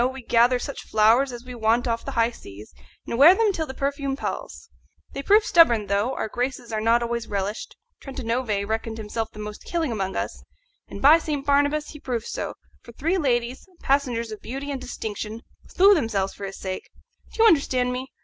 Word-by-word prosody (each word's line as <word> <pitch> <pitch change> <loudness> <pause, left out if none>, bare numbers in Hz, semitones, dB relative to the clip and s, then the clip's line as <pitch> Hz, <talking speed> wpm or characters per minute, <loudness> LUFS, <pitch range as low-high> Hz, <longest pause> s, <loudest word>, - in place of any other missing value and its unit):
we 265 -1 -10
gather 240 +2 +4
such 280 +3 -6
flowers 225 +5 +4
as 240 0 -9
we 250 - -8
want 230 +1 +1
off 230 -1 -1
the 275 - -6
high 230 -1 +2
seas, 105 - -13 0.3
and 235 - -3
wear 330 +7 +9
them 430 -1 +2
till 320 -3 -3
the 265 - -6
perfume 275 0 -2
palls. 460 - -6 0.5
They 275 - -4
prove 415 +7 +4
stubborn 240 - +5
though; 200 +6 0
our - - -2
graces 245 0 -4
are 215 - -1
not 230 +2 +3
always 235 -1 -3
relished. 200 +1 -4 0.3
Trentanove 230 -6 -2
reckoned 225 +1 -3
himself 220 +1 -4
the - - -16
most 210 0 -7
killing 330 -6 -2
among 195 -4 -3
us, 95 -11 -4 0.4
and 200 - -9
by 305 +4 +8
St. 295 -4 -3
Barnabas 285 +1 +2
he 300 - -10
proved 240 -4 -3
so, - - -4 0.3
for 235 - -14
three 335 +10 0
ladies 250 -2 -1
passengers 250 -5 0
of 215 - -8
beauty 275 +4 -5
and 270 -2 -4
distinction 220 -2 -6 0.2
slew 395 +2 +5
themselves 220 - 0
for 200 - -6
his 195 - -8
sake. 185 -1 -6 0.5
Do 450 - +3
you - - +8
understand 255 - +2
me? 255 +1 -4
245 Hz, 195 wpm, -24 LUFS, 220-280 Hz, 0.5 s, wear